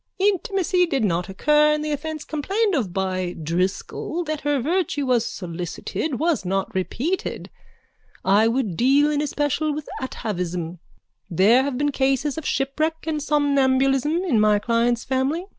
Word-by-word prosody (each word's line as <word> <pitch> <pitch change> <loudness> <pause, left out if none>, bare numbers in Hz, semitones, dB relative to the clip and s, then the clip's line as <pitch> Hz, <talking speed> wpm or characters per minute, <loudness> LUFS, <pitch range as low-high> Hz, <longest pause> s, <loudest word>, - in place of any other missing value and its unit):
Intimacy 385 -2 +1
did 275 -7 0
not 180 0 -1
occur 300 +9 +3
and 300 0 -3
the 305 - -2
offence 310 +1 -4
complained 390 +8 -1
of 235 - 0
by 185 -1 -2
Driscoll, 180 - -2
that 310 -2 -4
her 290 -1 +1
virtue 300 0 0
was 245 -3 +2
solicited, 180 - -4
was 325 - +1
not 195 +1 -2
repeated. 260 - -3 0.7
I 205 +3 +4
would 230 -6 0
deal 280 - +4
in 295 -1 0
especial 295 +1 0
with 300 -1 -6
atavism. 180 -8 -4 0.5
There 200 +8 +5
have 270 -2 -2
been 290 +1 +1
cases 270 +1 0
of 320 - -5
shipwreck 310 +4 -1
and 310 -2 -2
somnambulism 280 +1 +2
in 285 - +2
my 210 -1 +4
client's 235 +2 +1
family. 270 +7 -1
270 Hz, 145 wpm, -23 LUFS, 210-305 Hz, 0.7 s, There